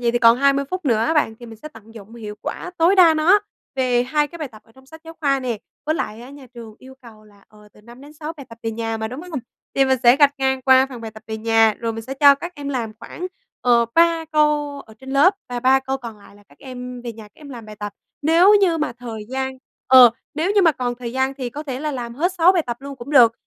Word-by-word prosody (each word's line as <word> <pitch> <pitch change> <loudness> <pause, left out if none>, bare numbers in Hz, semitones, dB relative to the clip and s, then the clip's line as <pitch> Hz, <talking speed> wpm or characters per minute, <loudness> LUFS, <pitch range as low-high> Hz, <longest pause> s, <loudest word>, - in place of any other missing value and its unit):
vậy 240 -1 +1
thì 240 - +1
còn 230 0 +6
20 280 0 +2
phút 370 -1 -4
nữa 235 -6 +2
á 235 +9 0
bạn, 295 -7 +1
thì 240 - -10
mình 225 -1 -11
sẽ 305 - -7
tận 225 -5 -17
dụng 220 0 -12
hiệu 215 -3 -8
quả 360 - -5
tối 335 +4 +4
đa 340 -4 +7
nó 345 +7 +4 0.3
về 250 -2 +1
2 295 +4 0
cái 340 - -11
bài 300 -4 -5
tập 215 -3 -16
ở 225 - -25
trong 265 +2 -21
sách 320 +3 -14
giáo 325 0 -11
khoa 275 -3 +1
nè. 245 -4 -3 0.3
Với 310 - +1
lại 215 -7 -4
á, 250 +3 -11
nhà 280 -2 -13
trường 230 -3 -11
yêu 260 0 -14
cầu 220 -3 -15
là, 205 -1 -22
ờ, 210 -1 -19
từ - - -20
5 240 +3 -15
đến 290 +2 -14
6 305 +1 -7
bài 280 - -11
tập 230 - -13
về 225 - -2
nhà 225 0 -3
mà, 220 0 -4
đúng 255 +5 -7
hông? 350 -5 -5 0.4
Thì 270 - +4
mình 265 -1 +1
sẽ 240 +1 +6
gạch 285 -1 +4
ngang 265 -1 0
qua 260 0 +5
phần 255 -3 -10
bài 225 -1 -7
tập 220 0 -14
về 220 0 -5
nhà, 225 -1 +3
rồi 230 -1 -3
mình 225 - -7
sẽ 265 +3 -6
cho 280 +1 +6
các 345 +5 -8
em 285 -2 -7
làm 235 -5 -3
khoảng, 340 +9 -7 0.3
ờ, 240 -1 +3
3 335 -1 +3
câu 295 -2 +1
ở 220 - -16
trên 265 0 -10
lớp 290 +8 +4
và 245 -1 -4
3 260 +2 +4
câu 265 0 -3
còn 235 -5 -10
lại 200 0 -18
là 205 - -20
các 145 - -23
em 250 -1 -9
về 235 -1 -6
nhà 220 - -12
các 210 - -19
em 295 -2 -14
làm 235 -4 -10
bài 215 0 -11
tập. 205 0 -6 0.3
Nếu 335 +7 +5
như 345 -4 +2
mà 305 - -2
thời 225 -3 -7
gian 265 0 -4 0.3
ờ, 255 -2 +8 0.2
nếu 330 +6 0
như 405 -2 +4
mà 325 - +5
còn 250 -3 -3
thời 240 -1 -7
gian 265 +1 -1
thì 255 -3 -5
có 295 +5 -7
thể 265 -3 -6
là 300 -1 -3
làm 240 -2 -6
hết 345 +8 0
6 355 0 +5
bài 350 -4 +1
tập 240 -1 -3
luôn 280 0 -8
cũng 250 +3 -10
được. 245 -6 +6
260 Hz, 290 wpm, -20 LUFS, 230-295 Hz, 0.4 s, ờ